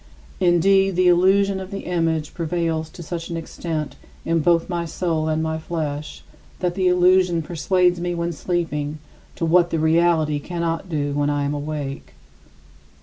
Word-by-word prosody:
Indeed, 195 +2 +3
the 180 0 +3
illusion 190 +2 +4
of 190 -1 -7
the 200 -1 -5
image 165 -3 -1
prevails 165 -1 -2
to 170 - -10
such 165 +1 -5
an 170 - -3
extent, 160 -2 -5 0.3
in 165 0 +1
both 165 +1 +2
my 175 -2 -2
soul 165 -2 -2
and 155 0 0
my 160 0 -2
flesh, 155 -3 -4 0.3
that 180 -1 -1
the 185 0 +1
illusion 180 -1 +4
persuades 180 +2 +1
me 175 0 -2
when 170 0 -2
sleeping 155 -3 -2 0.4
to 165 - -2
what 170 +1 +4
the 165 - -1
reality 160 -1 +2
cannot 170 +2 -3
do 145 -3 -1
when 145 0 +1
I 145 -1 0
am 140 +1 -1
awake. 145 - -5
170 Hz, 160 wpm, -22 LUFS, 155-180 Hz, 0.4 s, illusion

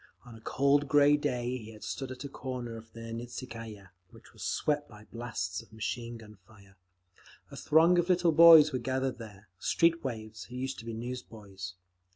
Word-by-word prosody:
On 120 - -12
a 110 - -13
cold 140 +4 +2
grey 145 +1 +5
day 125 -4 -2
he 110 -1 -10
had 105 - -13
stood 135 -2 -4
at 130 +1 -7
a - - -4
corner 125 -4 -6
of 115 0 -12
the 115 0 -8
Nikitskaya, 115 -4 -8 0.2
which - - -18
was - - -15
swept 145 -1 -1
by 105 -1 -14
blasts 110 -6 -4
of 115 - -20
machine 115 +2 -4
gun 105 -3 -14
fire. 100 -3 -19 0.8
A - - -9
throng 165 +3 +4
of 175 +1 0
little 175 -2 +4
boys 160 -2 +8
were 130 - 0
gathered 130 +1 -2
there—street 105 - -1
waifs 110 -4 -6
who 125 - -11
used 130 +1 -4
to 115 - -10
be 115 - -5
newsboys. 105 -6 -7
120 Hz, 185 wpm, -30 LUFS, 110-140 Hz, 0.8 s, boys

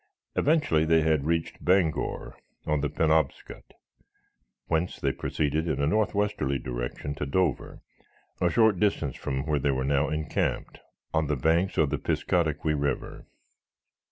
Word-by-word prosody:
Eventually 150 - +2
they 80 0 +4
had 80 -3 +1
reached 80 -1 -2
Bangor, 90 -3 +1 0.3
on 75 -1 0
the 75 - 0
Penobscot, 80 -1 -1 0.9
whence 80 +2 -1
they - - +1
proceeded 75 +2 -1
in 80 - -1
a 70 - +2
northwesterly 100 -5 0
direction - - -4
to 75 0 -4
Dover, 85 +1 -1 0.6
a 90 - +3
short 110 +1 +3
distance 80 -10 0
from 65 +1 -3
where 75 -2 +1
they 70 - 0
were 65 -1 0
now 70 +2 +1
encamped 75 0 -2 0.3
on 80 -2 +1
the 75 - 0
banks 80 +8 +1
of 75 -3 +3
the - - -1
Piscataqui 80 -3 0
river. 70 -1 -3
80 Hz, 140 wpm, -27 LUFS, 70-85 Hz, 0.9 s, they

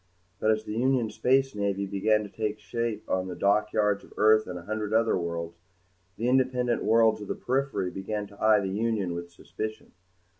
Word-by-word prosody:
But 110 - +1
as 110 0 +2
the 105 - -6
Union 120 -1 +1
Space 135 +1 +2
Navy 100 -1 -1
began 105 +2 +1
to - - -7
take 110 0 -3
shape 115 0 -4
on 95 0 -1
the 90 - -5
dockyards 105 +1 +1
of - - -17
Earth 110 0 +5
and 90 - -5
a 85 - -9
hundred 110 +2 -3
other 115 0 +3
worlds, 85 -1 -4 0.6
the 115 - -1
independent 125 -2 +1
worlds 110 -1 +4
of 105 - -7
the - - -2
periphery 130 -8 -1
began 105 +2 -4
to 100 +1 -11
eye 110 -1 +6
the 95 - -2
Union 105 -3 -1
with 85 0 -6
suspicion. 110 +5 -7
110 Hz, 190 wpm, -27 LUFS, 100-115 Hz, 0.6 s, eye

